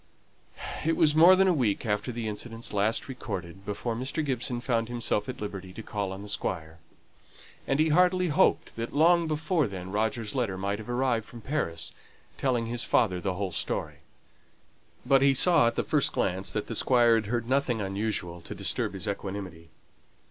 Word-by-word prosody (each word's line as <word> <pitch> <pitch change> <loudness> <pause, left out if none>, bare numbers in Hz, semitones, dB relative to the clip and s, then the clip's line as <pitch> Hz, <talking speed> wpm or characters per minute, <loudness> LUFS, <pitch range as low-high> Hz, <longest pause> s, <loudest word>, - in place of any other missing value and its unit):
It 165 0 +1
was 150 -2 +4
more 170 +4 +8
than 190 +1 +4
a 185 - +4
week 120 -8 0
after 105 +3 -1
the 115 -1 -4
incidents 115 +2 -4
just 105 +2 0
recorded 95 -8 -6
before 105 +4 -3
Mr. 135 +6 -2
Gibson 125 -2 -1
found 115 -2 -1
himself 120 -1 -1
at 130 - -6
liberty 95 -3 -6
to 115 - -8
call 100 -3 -3
on 95 +1 -7
the - - -9
Squire; 80 -5 -3 0.9
and 135 - +1
he 160 +1 +3
heartily 180 +2 +3
hoped 150 - +2
that 115 +3 -4
long 170 +2 +4
before 155 0 0
then, 95 -2 -7
Roger's 110 +1 -1
letter 115 -8 -1
might 100 +2 -2
have 110 - -9
arrived 120 -3 0
from 120 - -11
Paris, 85 - -3 0.4
telling 125 -4 0
his 120 +1 -2
father 95 -7 +2
the 95 -1 -2
whole 100 -1 -3
story. 85 - -3 1.1
But 135 +1 +4
he 135 0 +4
saw 170 -3 +5
at 120 - 0
the - - 0
first 150 -4 +1
glance 95 0 -1
that 105 - -2
the - - -5
Squire 120 0 +4
had 110 -2 +1
heard 120 0 -2
nothing 130 -3 +1
unusual 95 -3 -2
to - - -8
disturb - - -1
his 95 -3 -4
equanimity. 95 -4 -5
115 Hz, 185 wpm, -28 LUFS, 100-135 Hz, 1.1 s, more